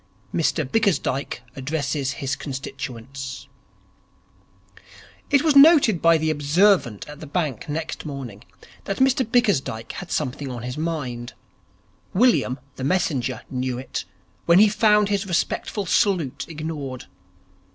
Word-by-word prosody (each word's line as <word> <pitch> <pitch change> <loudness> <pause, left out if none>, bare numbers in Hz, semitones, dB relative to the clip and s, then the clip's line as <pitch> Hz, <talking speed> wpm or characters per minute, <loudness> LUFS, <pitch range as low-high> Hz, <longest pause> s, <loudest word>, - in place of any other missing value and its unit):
10. 170 - 0
Mr 155 -1 +1
Bickersdyke 170 - 0
Addresses 140 0 -2
His 135 -1 -3
Constituents 135 0 -7 1.8
It 280 0 +4
was 310 -3 +3
noted 280 - +7
by 165 0 +5
the 155 0 0
observant 150 - +2
at 150 0 -10
the 155 - -9
bank 150 - -2
next 160 +2 -4
morning 130 -8 -7 0.4
that 195 - -3
Mr 265 0 +3
Bickersdyke 205 - 0
had 180 - -8
something 140 -1 -2
on 120 -2 -6
his 125 +1 -4
mind. 130 -7 -4 0.8
William, 220 - +3 0.2
the 130 - -5
messenger, 135 -6 0
knew 130 -1 -2
it, 130 -5 -5 0.4
when 170 +1 +6
he 210 +2 +7
found 210 -1 +3
his 200 -1 -1
respectful 195 +3 -1
salute 170 -8 +1
ignored. 150 -5 -5
155 Hz, 125 wpm, -23 LUFS, 130-195 Hz, 1.8 s, noted